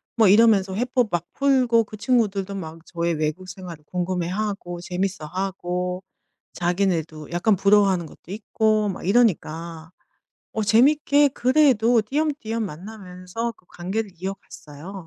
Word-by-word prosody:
뭐 225 -4 +5
이러면서 205 -3 +5
회포 245 +1 0
막 175 0 -1
풀고 255 -5 +3
그 215 0 -11
친구들도 205 -5 0
막 165 -3 -7
저의 170 -1 -2
외국 155 +4 -3
생활을 180 -5 -9
궁금해하고 180 +1 -3
재밌어하고 180 0 -3 0.5
자기네도 175 -4 -1
약간 195 +4 +2
부러워하는 195 -3 +3
것도 170 - -15
있고 215 0 0
막 185 - -6
이러니까 170 -7 0 0.6
어 220 - -1
재밌게 285 +6 +4
그래도 250 -4 +3
띄엄띄엄 265 -3 -2
만나면서 185 +4 -6
그 180 - -29
관계를 195 +4 -4
이어갔어요. 185 -3 -8
195 Hz, 305 characters per minute, -23 LUFS, 175-225 Hz, 0.6 s, 뭐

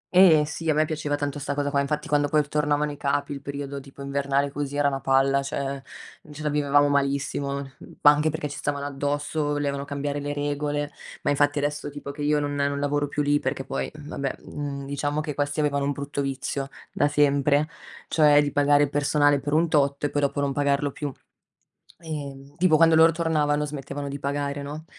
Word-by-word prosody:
Eh 165 -5 +7
sì, 160 +2 -4
a 155 - +3
me 155 +1 +3
piaceva 150 -2 -2
tanto 145 0 -3
sta 145 0 -3
cosa 145 -1 -1
qua, 140 - +2
infatti 150 +2 -2
quando 145 -2 +2
poi 150 0 +2
tornavano 150 0 0
i 145 - -8
capi 140 +1 -1
il 140 - -7
periodo 140 0 -5
tipo 140 0 -11
invernale 140 0 0
così 145 0 -4
era 145 0 +3
una 135 -1 -1
palla, 135 +1 +3
cioè 140 0 -3 0.5
ce 150 +1 -8
la 150 - +1
vivevamo 145 0 +3
malissimo, 140 0 0
mhmm, 135 -1 -9
anche 150 +1 +6
perché 155 -1 -3
ci 145 - -7
stavano 145 -1 -2
addosso, 145 +2 -2
volevano 145 -1 -1
cambiare 145 0 -3
le 145 0 -3
regole. 145 0 -2 0.3
Ma - - +2
infatti 145 +1 +2
adesso 145 0 -2
tipo 145 0 -7
che 145 +1 -9
io 150 0 +2
non 145 0 -2
non 140 0 0
lavoro 145 0 0
più 145 +1 -1
lì 145 0 +2
perché 135 0 -3
poi - - -3
vabbè, 145 -3 -5
mhmm, 140 -1 -5
diciamo 145 +1 -2
che 150 -1 -3
questi 145 +2 -2
avevano 140 -1 +1
un 145 - 0
brutto 140 0 -4
vizio 135 0 -3 0.2
da 145 - +2
sempre, 145 0 +3 0.4
cioè 150 -2 +5
di 145 - -2
pagare 145 +1 +4
il 140 - 0
personale 145 0 +3
per 145 +1 -3
un 165 +2 +3
tot 140 -3 +1
e 145 - 0
poi 145 - 0
dopo 140 0 0
non 140 -1 0
pagarlo 145 0 +1
più, 145 +1 -4 0.9
uhm, 145 -4 -7
tipo 170 -2 +4
quando 165 0 +6
loro 160 +1 +7
tornavano 150 -3 +1
smettevano 140 -1 -5
di 140 0 -5
pagare, 140 0 -2
no, 150 +3 -7
145 Hz, 205 wpm, -25 LUFS, 140-150 Hz, 0.9 s, Eh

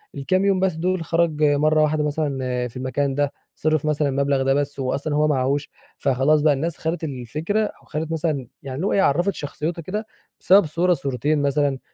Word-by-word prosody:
الكام 185 +8 +1
يوم 195 -2 +3
بس 190 -1 +1
دول 180 +2 -1
خرج 165 -2 +1
مرة 150 +1 +3
واحدة 150 0 +1
مثلًا 135 -5 -1
في 120 - -11
المكان 135 +2 -1
ده، 145 0 0 0.2
صرف 155 -1 0
مثلًا 150 -1 +1
المبلغ 140 0 +1
ده 135 0 +3
بس 145 0 -1
وهو 130 -1 0
أصلًا 145 +1 -2
هو 150 +1 +3
معاهوش، 140 0 0 0.3
فخلاص 140 +3 +2
بقى 150 0 +4
الناس 155 +4 -2
خدت 165 +1 -3
الفكرة 155 - -2
وخدت 160 +1 -4
مثلًا 150 -5 -1 0.2
يعني 135 -1 -6
اللي 180 +9 -1
هو - - 0
عرّفت 190 0 +2
شخصيتها 155 +4 -4
كده 210 +7 -4 0.3
بسبب 195 +1 +5
صورة 170 +4 +1
صورتين 145 0 -1
مثلًا. 140 -1 +1
150 Hz, 185 wpm, -22 LUFS, 140-165 Hz, 0.3 s, بسبب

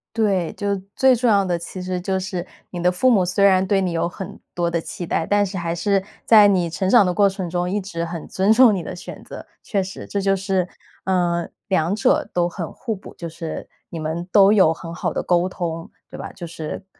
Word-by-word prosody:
对， 195 -7 +1
就 200 -1 -1 0.2
最 265 -1 +5
重 245 +1 0
要 200 -3 +4
的 180 -2 0
其 170 +2 -8
实 180 0 -3
就 190 +1 -1
是 185 -1 -4 0.2
你 175 -1 -6
的 180 - +3
父 220 +9 +2
母 195 -6 +4
虽 180 +3 +1
然 190 -1 +5
对 195 0 +2
你 185 - -1
有 170 0 0
很 185 +1 -8
多 170 -1 0
的 170 - 0
期 170 +1 -7
待， 165 - 0
但 205 +2 +2
是 190 -1 -4
还 170 -1 -2
是 195 +2 +1 0.2
在 210 -2 +7
你 180 -4 +2
成 180 +4 -2
长 215 +1 +6
的 180 - +1
过 205 -1 +5
程 190 -3 -3
中 175 +1 -1
一 205 +1 -1
直 170 -3 -4
很 170 -1 -6
尊 195 +3 +2
重 235 -2 +6
你 180 - -3
的 - - -6
选 175 - -9
择。 - - -10 0.2
确 200 -3 0
实， 190 +1 -7
这 200 - -2
就 195 0 +2
是， 190 -2 -1 0.4
嗯， 175 -2 0 0.2
两 185 -1 +1
者 215 - +2
都 175 -1 +1
很 175 -2 -6
互 225 -4 -4
补， 190 - -13
就 170 - -5
是 165 0 -6 0.2
你 165 - -7
们 160 +3 -4
都 200 0 +6
有 185 -6 +5
很 165 +1 -7
好 170 - -2
的 - - -3
沟 175 +1 +2
通， 165 -2 -4 0.2
对 - - -8
吧？ - - -6
就 170 - -8
是， 165 +3 -6
185 Hz, 255 characters per minute, -21 LUFS, 170-200 Hz, 0.4 s, 在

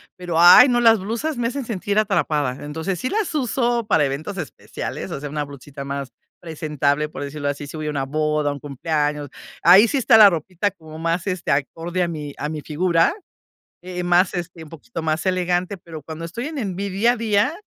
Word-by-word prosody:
pero 175 -2 -2
ay, 250 +10 +9
no, 240 0 +2
las 225 -3 +5
blusas 235 +9 -3
me 235 -1 0
hacen 270 -1 -5
sentir 205 -1 -1
atrapada. 150 - 0
Entonces, 160 +5 -4
sí 255 - -2
las 420 -5 -1
uso 240 -3 0
para 160 -8 +3
eventos 155 +9 -4
especiales, 155 -9 -6
o - - -4
sea, 145 0 -6
una 150 0 -2
blusita 140 0 -9
más 140 -1 -5 0.3
presentable, 150 -2 -1
por 145 - -7
decirlo 145 0 -3
así, 145 0 -5
si 155 - -8
voy 155 0 -4
a - - 0
una 140 -3 -2
boda, 150 0 0
un 140 - -6
cumpleaños, 150 0 -2 0.3
ahí 195 +6 +7
sí 280 - 0
está 225 -3 +5
la 210 -2 +10
ropita 180 +4 -2
como 160 -3 -12
más, 165 +1 -1
este, 185 -2 -2
acorde 165 +5 -1
a 175 - 0
mi 150 -3 -6
a 150 - -3
mi 155 -2 -5
figura, 165 - +1 0.7
eh, 180 0 -5
más, 175 +1 +3
este, 170 -2 -5
un 155 - -13
poquito 165 +3 -8
más 155 0 -1
elegante. 180 +1 0
Pero 160 -2 -10
cuando 160 +2 -8
estoy 230 +10 -5
en 310 -2 -6
en 195 -8 -3
vi 200 +2 -3
día 215 +6 +2
a - - -5
día, 215 +4 +1
170 Hz, 210 wpm, -21 LUFS, 150-200 Hz, 0.7 s, la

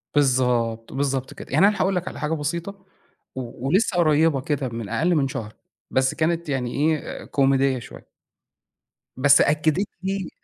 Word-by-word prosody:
بالضبط، 125 -5 +1
بالضبط 135 -1 -2
كده. - - -10
يعني 195 - +5
أنا 210 - +1
هاقول 190 0 +1
لك 180 +1 -2
على - - -6
حاجة 155 +1 -1
بسيطة 170 +6 -4 0.5
و 125 0 -6
ولسه 190 +3 +2
قريّبة 155 -3 +3
كده 140 -3 -2
من 115 -4 -6
أقل 175 +1 +1
من 140 -3 +2
شهر، 110 -4 -6 0.4
بس 130 0 +2
كانت 165 0 -1
يعني 125 -3 -2
إيه 155 +2 -1
كوميدية 135 -1 +2
شوية. - - -12 1.1
بس 140 +1 +6
أكّدِت 155 +6 +2 0.2
لي 195 -2 -2
145 Hz, 155 wpm, -23 LUFS, 130-170 Hz, 1.1 s, بس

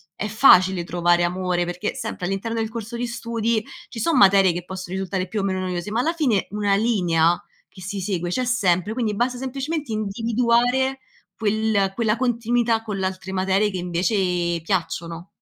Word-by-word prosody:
è 210 - -3
facile 190 -5 +5
trovare 175 0 +2
amore 180 0 0
perché 175 +1 -3
sempre 180 - -5
all'interno 195 +5 -3
del 220 -1 -1
corso 230 +1 -6
di 245 - -2
studi 230 -1 -1 0.2
ci 230 - -8
sono 320 +5 +1
materie 195 -4 +6
che 175 0 -5
possono 185 0 -6
risultare 190 -1 -2
più 210 +3 -2
o - - -3
meno 190 -1 -1
noiose, 180 +1 -3
ma 225 - 0
alla 325 +6 0
fine 260 - +1
una 205 -1 0
linea 175 -6 +2 0.3
che 185 - -14
si 195 +2 -5
segue 180 -2 -2
c'è 255 - 0
sempre, 205 -4 +1
quindi 225 -4 -1
basta 245 +3 0
semplicemente 270 +2 -4
individuare 235 +5 +1 0.4
quel 215 -2 +1
quella 225 -1 +1
continuità 235 -1 +1
con 210 -3 -5
le 190 - -1
altre 190 0 -4
materie 190 +2 +1
che 185 - -4
invece 175 -1 0
piacciono. 170 -1 -3
200 Hz, 175 wpm, -22 LUFS, 185-230 Hz, 0.4 s, materie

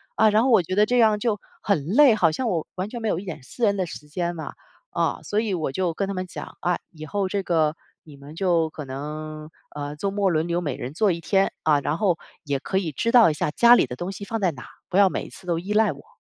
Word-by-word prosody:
啊， 220 - +5
然 215 +1 +4
后 265 - +2
我 225 -6 +6
觉 185 - -5
得 210 +1 +5
这 245 +3 +1
样 220 -3 +4
就 210 -2 0 0.2
很 180 -9 0
累， 245 - +6
好 170 -7 +3
像 245 +8 -2
我 170 -6 -1
完 185 +2 -3
全 240 +1 -6
没 220 - -1
有 170 - 0
一 200 - -9
点 160 -7 -7
私 235 - -2
人 200 -1 +2
的 185 - 0
时 150 -3 -9
间 175 +3 -3
嘛。 160 - -6 0.4
啊， - - 0
所 210 - -1
以 220 -3 -2
我 155 -6 -2
就 175 +3 -1
跟 195 +4 -2
他 200 - -3
们 185 -1 -4
讲 - - -9
啊， 175 -1 +1
以 155 -2 -9
后 195 +4 -2
这 200 0 -1
个 160 -3 +1 0.3
你 150 -3 -14
们 140 +3 -12
就 170 -3 +1
可 155 - -7
能 155 +3 -6 0.3
呃， 145 0 -5
周 195 +6 -2
末 200 -1 +1
轮 160 -1 0
流 170 +1 +1
每 145 -7 -3
人 125 +3 -6
做 195 +2 +2
1 170 - -6
天 195 +2 +2
啊， 150 -2 +4
然 145 +3 -2
后 180 -3 +2 0.3
也 140 -3 -1
可 190 - -2
以 180 -5 -1
知 230 - -1
道 235 -6 +7
一 - - -2
下 150 - -1
家 235 +9 +6
里 - - +4
的 125 - -7
东 175 +7 -4
西 200 +1 -8
放 225 +1 -3
在 185 -3 +2
哪， 130 -4 -11 0.2
不 185 - 0
要 200 -1 +7
每 - - -4
次 190 -2 -14
都 170 -2 0
依 190 +4 -6
赖 210 -4 +3
我。 140 - -17
180 Hz, 295 characters per minute, -24 LUFS, 155-205 Hz, 0.4 s, 道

